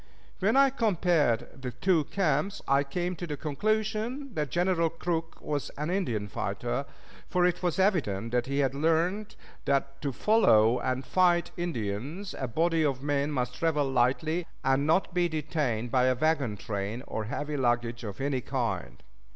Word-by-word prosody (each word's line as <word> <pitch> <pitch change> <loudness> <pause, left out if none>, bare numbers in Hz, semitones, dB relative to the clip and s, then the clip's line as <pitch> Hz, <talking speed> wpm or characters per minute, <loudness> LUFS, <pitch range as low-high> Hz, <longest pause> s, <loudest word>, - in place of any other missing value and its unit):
When 210 +7 +2
I 275 -1 +6
compared 175 - +1
the 130 - -3
two 155 +5 +1
camps, 190 +2 0
I 140 +1 +4
came 175 +6 -3
to 175 - -5
the 150 -2 -4
conclusion 215 - -1
that 150 -5 -2
General 175 +2 +2
Crook 165 0 -3
was 145 -2 -3
an 150 +4 -2
Indian 120 - -1
fighter; - - -3 0.4
for 180 -1 +3
it 180 -1 +1
was 175 -3 0
evident 135 - +1
that 125 0 0
he 140 +1 -2
had 135 - -1
learned 165 +8 0 0.3
that 140 0 0
to 140 - -1
follow 120 - +4
and 130 +1 -2
fight 175 0 +3
Indians 150 - -4
a 130 - -1
body 165 +6 +1
of 135 -3 0
men 145 0 0
must 125 -4 -1
travel 150 0 +1
lightly, 135 +7 +1 0.2
and 135 +2 +2
not 175 +3 +2
be 175 -1 +2
detained 145 -7 -2
by 125 -1 +3
a 130 0 +3
wagon 135 -6 +1
train 105 +4 -4
or 110 - -4
heavy 145 +6 -3
luggage 120 -2 0
of 105 0 -6
any 135 -1 0
kind. 115 -12 -3
150 Hz, 165 wpm, -28 LUFS, 125-175 Hz, 0.4 s, I